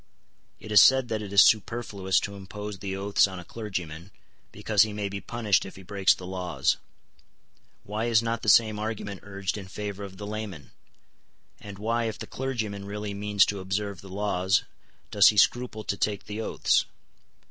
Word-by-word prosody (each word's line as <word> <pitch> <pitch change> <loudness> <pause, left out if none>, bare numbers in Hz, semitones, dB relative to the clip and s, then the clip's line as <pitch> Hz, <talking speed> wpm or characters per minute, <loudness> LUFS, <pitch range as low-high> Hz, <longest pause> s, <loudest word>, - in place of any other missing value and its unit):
It 110 - -10
is 105 - +9
said 130 -2 +5
that 110 -1 -2
it 100 -2 -7
is 100 0 +8
superfluous 105 -3 +1
to 100 - -5
impose 100 +1 -7
the 95 0 -4
oaths 100 +1 +3
on 95 -1 -8
a 90 - -9
clergyman, 90 -6 -6 0.4
because - - +1
he 110 -1 +3
may 105 -1 -3
be 100 0 -5
punished 110 -5 +1
if 95 - -10
he 95 - -12
breaks 100 +1 +2
the 90 - -10
laws. 90 -1 -1 1.1
Why 105 +3 -3
is 115 -1 +3
not 115 0 -2
the 110 - 0
same 110 0 +5
argument 105 -3 -4
urged 100 0 -4
in 95 - -9
favour 100 0 -6
of 95 -1 -9
the 105 - -7
layman? 100 - -6 0.9
And 100 -1 -10
why, 115 +3 -1
if 110 -1 -3
the - - -7
clergyman 110 -7 -4
really 105 0 -5
means 100 0 +3
to 100 - -3
observe 95 0 -3
the 95 - -12
laws, 95 -1 +1 0.5
does 100 -2 +6
he 105 - +4
scruple 120 0 +2
to 100 - -3
take 105 -1 -1
the 105 +1 -5
oaths? - - +1
100 Hz, 185 wpm, -27 LUFS, 95-110 Hz, 1.1 s, is